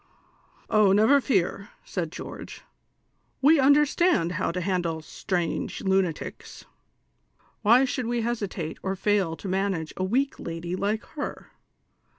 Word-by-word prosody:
" - - -35 0.3
Oh, 210 -3 +5
never 225 +8 +5
fear," 200 -5 0 0.2
said 170 -4 -3
George; - - -8 0.4
" - - -45
we 305 +2 +6
understand 285 - +3
how 180 - -1
to 180 - -3
handle 170 -3 -1
strong 175 +1 -2
lunatics; 190 -4 -2 1.0
why 240 +5 +5
should 255 -2 -2
we 240 0 0
hesitate 205 -8 -3
or 190 0 -2
fail 195 -4 +1
to 195 - -8
manage 190 -4 -1
a 185 - -1
weak 260 +9 0
lady 170 +1 -4
like 205 +7 -3
lier 290 - -6
195 Hz, 135 wpm, -26 LUFS, 175-240 Hz, 1.0 s, we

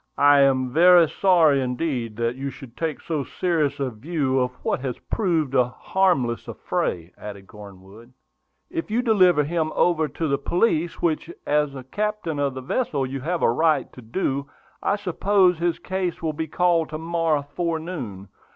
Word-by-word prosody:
"I 145 0 +6
am 130 -2 +2
very 175 +1 +7
sorry 160 -6 +3
indeed 125 -3 -2
that 115 +1 -1
you 135 +1 -4
should 130 -2 -12
take 160 -3 -3
so 155 -4 -2
serious 155 -2 -1
a 135 -2 -1
view 135 +2 -1
of 125 0 +1
what - - 0
has 130 -2 -4
proved 165 - -1
a 125 -2 +4
harmless 135 -5 0
affray," 85 0 -3
added 100 -2 -9
Cornwood. 100 +2 -14 0.6
"If 335 -7 -4
you 235 +3 0
deliver 185 - +4
him 160 +1 -1
over 160 -3 +2
to 155 +3 -3
the 140 -1 0
police, 175 +1 0
which, 165 -1 0 0.2
as 150 -1 +1
the 130 -2 -8
captain 205 0 -3
of 140 -2 0
the 130 - -5
vessel, 140 - -1
you 135 +1 -5
have 170 +4 -2
a - - +4
right 155 +5 +1
to 125 - -11
do, 140 +3 -2 0.3
I 200 - +1
suppose 190 -2 +2
his 170 -1 0
case 185 -2 -3
will 160 -2 -2
be 160 +2 -4
called 170 0 +1
to 155 - -5
morrow 165 -2 0
forenoon. 160 - -4
150 Hz, 170 wpm, -23 LUFS, 130-175 Hz, 0.6 s, very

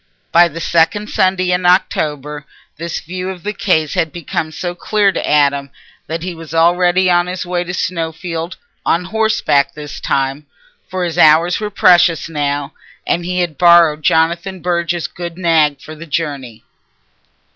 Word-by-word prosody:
By 175 +1 +6
the 165 0 -8
second 170 +6 +1
Sunday 185 -1 +1
in 180 0 0
October 150 -5 0 0.3
this 170 +1 -4
view 180 +3 -5
of 185 -3 -8
the 210 +1 -3
case 160 -8 0
had 160 - 0
become 160 -1 -4
so 175 +2 -4
clear 205 +2 +1
to - - -3
Adam 140 -1 +2 0.4
that 165 +1 -4
he 180 0 -4
was 165 -1 -9
already 175 +2 +3
on 175 0 +3
his 180 0 -4
way 175 0 -1
to 180 - -6
Snowfield, 165 0 -4 0.3
on 175 +2 +1
horseback 200 -9 +1
this 150 -1 -8
time, 135 +2 -2 0.4
for 185 -1 -3
his 175 0 -2
hours 165 +2 +5
were 210 -1 -3
precious 175 -5 +4
now, 145 -2 -2 0.3
and 175 - 0
he 180 0 -1
had 165 -5 -3
borrowed 170 -3 +5
Jonathan 170 +5 +1
Burge's 170 -2 -1
good 170 +3 -7
nag 160 -5 +2
for 155 - -10
the 165 +2 -11
journey. 140 -7 -4
170 Hz, 160 wpm, -16 LUFS, 155-180 Hz, 0.4 s, By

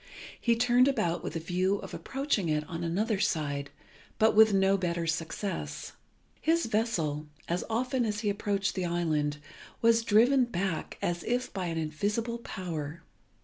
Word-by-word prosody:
He 235 -1 +3
turned 245 +2 +4
about 175 -11 0
with - - -5
a - - 0
view 180 +4 +1
of - - -7
approaching 270 - -1
it 150 0 0
on 170 -1 -5
another 200 +5 0
side, 145 -8 -1 0.5
but 220 +1 +4
with 220 0 +8
no 195 0 +4
better 170 -3 -1
success. 165 +4 -3 0.5
His 335 +1 +2
vessel, 170 -10 -1 0.2
as 175 +1 -1
often 250 +3 0
as 210 -1 -1
he 210 - 0
approached 200 -1 -1
the 185 - -2
island, 155 -4 0 0.4
was 230 0 +4
driven 240 +5 +4
back 190 -6 -3
as 175 0 -1
if 245 +2 -1
by 185 -3 -2
an 165 -1 -2
invisible 205 +10 -1
power. 170 -7 -5
195 Hz, 155 wpm, -29 LUFS, 165-230 Hz, 0.5 s, with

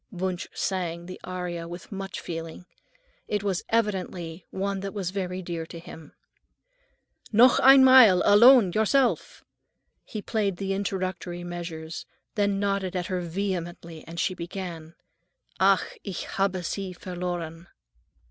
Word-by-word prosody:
Wunsch 185 -2 -3
sang 175 -3 -3
the 185 +1 -9
aria 180 -2 -5
with 175 +3 -9
much 195 -1 -5
feeling. 165 0 -7 0.6
It 205 -1 -1
was 195 -3 0
evidently 185 -6 -2
one 195 +1 -2
that 195 +1 -6
was 185 -3 -2
very 185 -1 -3
dear 170 -2 -4
to 170 - -9
him. 165 -2 -11 1.2
"Noch 235 +3 +6
einmal, 260 -8 +8
alone, 220 0 +7
yourself." 240 +4 +1 0.6
He 215 - -6
played 205 -3 -1
the 195 0 -2
introductory 185 -3 -3
measures, 170 -2 -6 0.3
then 200 -2 +1
nodded 195 -2 -1
at 180 -1 -1
her 180 - 0
vehemently, 175 -2 -4
and 170 +1 -7
she 185 - +1
began:— 170 -2 -7 0.6
"Ach, 195 0 +2
ich 195 -3 -5
habe 195 -2 -1
sie 190 0 -4
verloren." 175 -2 -5
185 Hz, 130 wpm, -26 LUFS, 175-200 Hz, 1.2 s, einmal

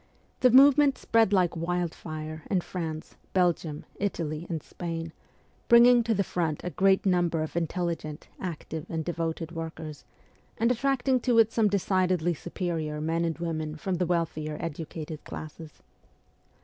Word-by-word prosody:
The 255 - +6
movement 275 +2 +6
spread 225 -3 +3
like 180 -4 +3
wildfire 160 -2 -3
in 185 -3 +2
France, 160 -3 -6 0.2
Belgium, 170 -4 0
Italy, 165 -5 -2
and 160 -3 -3
Spain, 165 -2 -5 0.5
bringing 240 0 +7
to 225 -1 +1
the 200 - +2
front 165 -5 -1
a 180 - -3
great 195 +2 +3
number 175 -4 +2
of 155 - -6
in 170 -1 +1
telligent, 170 -4 -3 0.2
active, 160 -3 -5
and 160 -2 -3
devoted 165 -1 -3
workers, 160 -2 -7 0.5
and 230 +1 +3
attracting 260 +1 +1
to 245 -1 +1
it 225 -1 +5
some 225 -2 +3
decidedly 185 -3 +1
superior 160 -2 -3
men 165 +2 0
and 165 -1 -1
women 155 -2 -3
from 180 +3 -2
the 180 0 0
wealthier 155 -3 -1
educated 160 -1 -6
classes. 155 0 -9
170 Hz, 145 wpm, -28 LUFS, 160-195 Hz, 0.5 s, bringing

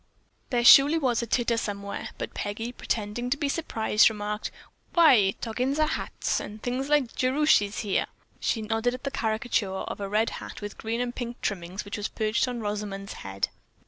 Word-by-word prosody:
There 240 -2 +1
surely 285 +6 +9
was 255 -7 +1
a 235 - -4
titter 235 0 +1
somewhere; 200 -2 -4
but - - -5
Peggy, 225 +4 -4
pretending 235 0 -3
to 275 - +1
be 290 - -1
surprised, 220 -8 +3
remarked: 210 0 -4 0.5
"Why, 250 - +6
toggins 255 +5 -1
are 310 - +4
hats - - -2
and 210 +1 -7
things 255 +4 -2
like 290 -5 +2
Jerushy's 255 -6 +2
here." 205 -3 0 0.3
She 225 - -1
nodded 225 +3 0
at 255 - -11
the 275 - -2
caricature 220 -3 0 0.2
of - - -6
a 200 - -3
red 215 +3 +1
hat - - -8
with 205 -1 -7
green 230 +2 -2
and 245 -1 -2
pink 240 -1 -5
trimmings 185 0 -3
which 200 - -5
was 210 - -2
perched 220 +3 0
on 245 -2 -4
Rosamond's 205 -1 -4
head. 95 0 -2
225 Hz, 180 wpm, -27 LUFS, 205-250 Hz, 0.5 s, surely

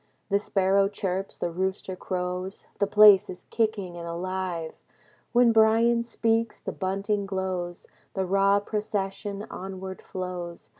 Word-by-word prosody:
The 200 - +4
sparrow 195 -1 +2
chirps. 195 -1 -3
The 170 - -2
rooster 190 +1 -2
crows. 180 +1 -4
The 200 - +2
place 210 -1 +7
is 180 - -9
kicking 215 -6 -1
and 170 0 -6
alive. 175 -1 -3 0.6
When 240 -1 +5
Bryan 225 +1 +4
speaks, 230 -1 0
the - - -5
bunting 200 +1 -2
glows. 185 -2 -3 0.3
The 190 -1 0
raw 195 +2 +3
procession 205 -1 -3
onward 190 0 -7
flows. 180 -2 -6
195 Hz, 130 wpm, -27 LUFS, 185-210 Hz, 0.6 s, place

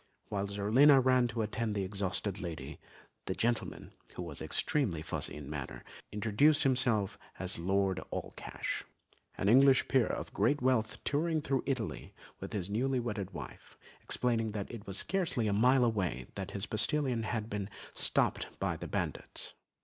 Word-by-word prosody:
Whilst 100 0 -2
Zerlina 130 +8 +6
ran 130 -1 +4
to 115 -2 -2
attend 110 0 -2
to - - 0
the 95 - 0
exhausted 100 0 -1
lady, 85 -4 -6 0.5
the - - -1
gentleman, 120 0 -1 0.2
who 90 - -4
was 80 -4 -5
extremely 100 - 0
fussy - - -2
in 75 -2 -8
manner, 70 -3 -6 0.3
introduced 115 +9 +3
himself 125 -7 +2 0.2
as - - +1
Lord 95 +1 +1
Allcash, - - -4 0.5
an 95 - 0
English 130 +4 +6
peer 130 -4 +3
of - - -4
great 120 +9 +2
wealth 125 -5 +1
touring 160 +2 +1
through 135 -2 +1
Italy 130 -6 -3 0.2
with - - -7
his 95 -4 -2
newly 125 +6 0
wedded 105 -5 -3
wife, 90 - -10 0.2
explaining 115 -3 0
that 100 -2 -4
it 115 -4 -9
was 95 0 -2
scarcely 170 - 0
a 105 - +1
mile 125 +4 +5
away 95 - -1
that 95 -1 -4
their 100 0 -5
postillion 120 +2 +2
had 110 -1 -2
been 105 -2 -4 0.2
stopped - - +1
by - - 0
the - - -6
bandits. - - -4
110 Hz, 160 wpm, -32 LUFS, 100-130 Hz, 0.5 s, Zerlina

